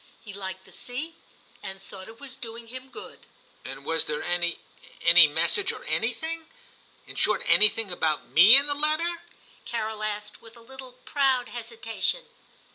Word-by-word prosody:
He 205 - -9
liked 190 -1 -6
the - - -18
sea, 295 +7 -6 0.5
and 195 0 -7
thought 190 -1 -11
it 225 +1 -13
was 270 -2 -6
doing 230 -3 -8
him 255 +2 -7
good.' 425 +9 -10 0.4
'And 135 +1 -7
was 165 -1 +1
there 150 -1 -3
any 175 -1 0 0.3
— - - -21
any 170 -1 +8
message 170 - +1
or - - -10
anything 320 +9 -3 0.6
"i - - -12
in - - -12
short, - - 0
anything 215 - +4
about 160 -3 -1
me 195 +9 +8
in 280 +1 +6
the 290 - +2
letter? 310 +4 +2 0.2
' - - -28
Carol 220 -2 -3
asked 210 0 -4
with 230 +1 -15
a - - -15
little 260 +1 -12
proud 265 -3 +1
hesitation. 230 - -2
225 Hz, 175 wpm, -26 LUFS, 190-270 Hz, 0.6 s, any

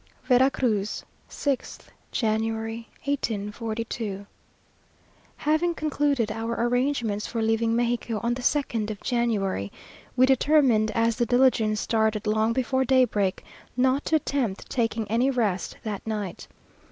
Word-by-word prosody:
VERA 255 +1 +4
CRUZ, 215 -6 -1 0.2
6th 280 -3 -3 0.2
January, 225 0 -1 0.2
1842. 220 -4 -3 1.1
Having 315 +3 +1
concluded 285 -7 0
our 225 +1 -3
arrangements 240 -4 0
for 230 -1 -2
leaving 225 +1 +1
Mexico 235 -2 0
on 235 +1 +1
the 250 - -5
2nd 240 -6 0
of 210 -2 -5
January, 210 - -1 0.4
we 255 0 +6
determined, 265 -4 +4
as 230 0 +2
the 240 - +2
diligence 245 -4 +3
started 220 -2 0
long 215 +1 +2
before 260 +2 +1
daybreak, 245 -7 +2 0.3
not 260 +2 +2
to 320 - +2
attempt 265 -9 -1
taking 225 -3 0
any 235 +5 +2
rest 215 -9 -1
that 215 -1 -5
night. 210 -5 -4
230 Hz, 120 wpm, -26 LUFS, 215-260 Hz, 1.1 s, we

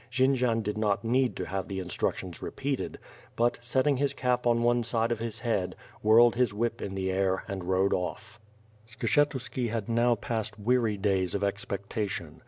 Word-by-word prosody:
Jendzian 125 -2 +2
did 105 +1 -2
not 105 -1 +1
need 125 +2 +2
to - - -3
have 95 0 -3
the 95 - -4
instructions 90 -1 -3
repeated; 135 -1 -3 0.4
but, 120 +1 +1
setting 130 +3 +1
his 140 +1 0
cap 125 -2 0
on 120 0 +3
one 120 0 +3
side 115 0 0
of 115 - -1
his 115 -1 -5
head, 110 -7 -1 0.3
whirled 115 +2 +6
his 120 -4 +1
whip 115 +2 -1
in 95 - -4
the 95 -1 -1
air, 95 0 +1
and 95 -2 -5
rode 95 +2 +2
off. 110 +6 -4 0.5
Skshetuski 125 0 0
had 110 -2 -3
now 120 +1 +3
passed 110 -1 -3
weary 115 0 +1
days 95 -2 +1
of 100 - -1
expectrtion. 100 0 -3
115 Hz, 175 wpm, -29 LUFS, 100-120 Hz, 0.5 s, whirled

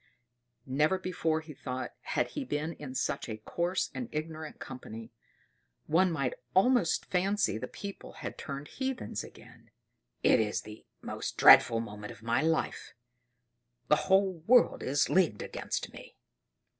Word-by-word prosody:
Never 150 +7 +2
before, 165 -4 -1
he 155 -1 -10
thought, 130 -2 -5
had - - -1
he 290 - -4
been 155 - -2
in 140 -4 -8
such - - -2
a 110 - -4
coarse 170 - -1
and 245 - -5
ignorant 155 0 -5
company; 115 -3 -9 0.7
one 180 +4 +3
might 140 -6 -1 0.2
almost 200 -3 +3
fancy 190 - +1
the - - -4
people 200 0 -8
had - - -6
turned 140 0 -6
heathens 265 - -3
again. - - -15 0.5
"It - - +5
is 105 -2 0
the 105 0 -12 0.2
most - - -5
dreadful 115 0 +8
moment 105 -2 -7
of 110 - -13
my 115 +2 +1
life: 160 0 -1 0.9
the 150 - +2
whole 190 -2 +4
world 245 0 +5
is 140 +2 +1
leagued 170 - +2
against - - -4
me!" - - -12
155 Hz, 145 wpm, -30 LUFS, 130-185 Hz, 0.9 s, dreadful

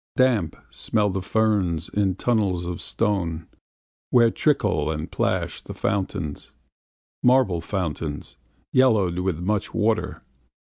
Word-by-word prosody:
Damp 115 - +2 0.2
smell 105 -3 0
the 95 0 -2
ferns 95 -5 +1
in 100 -3 0
tunnels 100 -6 0
of 85 0 -4
stone, 85 -7 -1 0.6
Where 120 -2 +5
trickle 105 - +1
and 75 0 -4
plash - - -1
the - - -9
fountains, 95 -6 -3 0.7
Marble 125 -9 +3
fountains, 80 -5 -4 0.4
yellowed 105 -9 +3
with 90 -3 -1
much 100 +4 -2
water. 110 0 0
95 Hz, 110 wpm, -24 LUFS, 85-110 Hz, 0.7 s, Where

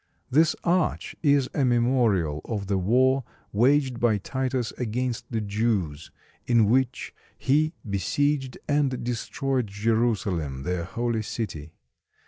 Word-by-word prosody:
This 155 +4 +4
arch 175 -1 0
is 140 -4 +3
a 140 - +1
memorial 120 - +2
of 105 -4 -3
the 95 0 0
war 130 +7 +3 0.3
waged 130 +3 +3
by 115 -3 +3
Titus 130 +2 -2
against 125 +1 -2
the 115 -2 -1
Jews, 100 -8 -1 0.4
in 115 -3 +4
which 125 +3 0 0.2
he 155 +4 +1
besieged 135 +6 0
and 145 -3 +1
destroyed 125 +1 -2
Jerusalem, 105 - 0
their 90 +1 -2
holy 115 +2 -1
city. 85 -9 -5
120 Hz, 115 wpm, -26 LUFS, 100-130 Hz, 0.4 s, This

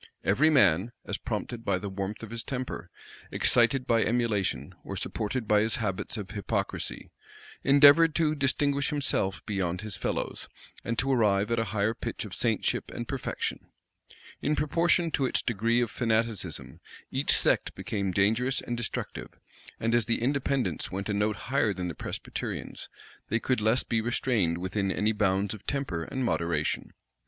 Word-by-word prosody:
Every 135 +11 +4
man, 105 - +4
as - - -3
prompted 115 -2 -4
by 95 - +1
the 100 +2 -5
warmth 100 +2 -4
of 115 - -8
his 115 0 -2
temper, 125 -9 -5 0.4
excited 125 +2 +3
by 115 -1 +3
emulation, 105 - 0
or - - -6
supported 110 +2 -2
by 105 0 +5
his 110 +1 +2
habits 105 -2 -2
of 105 -2 -6
hypocrisy, 100 -2 -3 0.5
endeavored 145 +3 +7
to 155 -2 +2
distinguish 140 0 +1
himself 140 -10 0
beyond 90 -4 -2
his 105 -3 -4
fellows, - - -3 0.3
and 115 0 -2
to 135 +3 +1
arrive 105 -4 +2
at 115 - +2
a 115 - 0
higher 105 0 0
pitch - - -5
of - - -9
saintship - - 0
and - - -6
perfection. - - -3 0.7
In 150 - +1
proportion 165 +3 +2
to 135 -3 +1
its - - 0
degree 115 +1 +1
of 120 - -1
fanaticism, 110 - -1 0.3
each - - +1
sect - - +2
became 100 -3 -2
dangerous 110 +8 +2
and 120 - -3
destructive; 120 -2 -4 0.5
and 115 +1 0
as 120 -2 +3
the 115 0 0
Independents 140 0 0
went 100 +3 -4
a - - +1
note 105 +1 +1 0.2
higher 115 -7 +2
than 90 -1 -3
the - - -4
Presbyterians, - - -5 0.4
they 115 - +1
could 125 -1 0
less 110 +4 +3
be 110 -1 0
restrained 110 -7 0
within 95 +2 -1
any 105 +3 +1
bounds 100 -1 +1
of 110 - -10
temper 130 - -2
and 130 -1 -3
moderation. 85 -7 -1
115 Hz, 165 wpm, -28 LUFS, 100-130 Hz, 0.7 s, endeavored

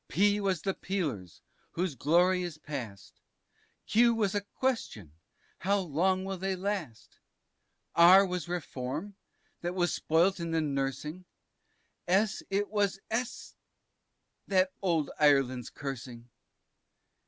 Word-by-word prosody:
P 205 +3 +2
was 190 -5 -1
the 195 - 0
Peelers, 140 - -4 0.3
whose 180 -2 -1
glory 175 +7 +3
is 175 -4 -5
past, 125 -11 -8 0.6
Q 235 +1 +4
was 210 -4 0
a 205 - 0
Question 200 - -3 0.5
how 200 +3 +1
long 185 +2 0
will 195 -1 -4
they 190 +1 -1
last? 185 - -5 0.7
R 185 +4 +8
was 180 -2 -3
Reform, 165 +2 -4 0.5
that 175 +1 -3
was 175 -2 +1
spoilt 175 +4 +2
in 170 0 -3
the 165 0 +1
nursing, 150 +4 -3 0.8
S 195 +3 +2
it 200 +1 0
was 205 -2 +1
S 240 +2 -3
y, 195 - -14
that 185 0 +3
old 165 -6 0
Ireland's 135 -5 +3
cursing. 125 -4 -7
180 Hz, 120 wpm, -30 LUFS, 145-195 Hz, 0.8 s, R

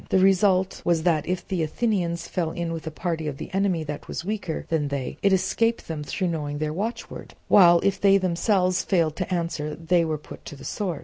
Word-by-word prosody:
The - - +3
result 190 0 +3
was 170 -2 +1
that 165 -4 +1
if 180 -1 -2
the 185 -3 -1
Athenians 170 -1 -1
fell 170 -3 -1
in 170 0 -3
with 165 -1 -6
a - - 0
party 160 0 -3
of 140 -2 -4
the - - -8
enemy 190 -4 +1
that 150 -1 -6
was 170 - -5
weaker 200 -5 -3
than 155 -3 0
they, 140 -2 -4
it 200 - +3
escaped 195 +5 +1
them 155 -2 -4
through 180 +5 -2
knowing 145 -3 -3
their 150 0 -2
watchword; 215 +8 -5
while 175 -3 +7
if 200 - +1
they 195 -1 +6
themselves 185 0 +1
failed 165 -5 +1
to 185 0 -3
answer 165 -4 -2
they 170 +2 +2
were 160 -2 -1
put 150 - -12
to - - -8
the 140 - -12
sword. 180 -8 -3
170 Hz, 215 wpm, -25 LUFS, 160-190 Hz, -, while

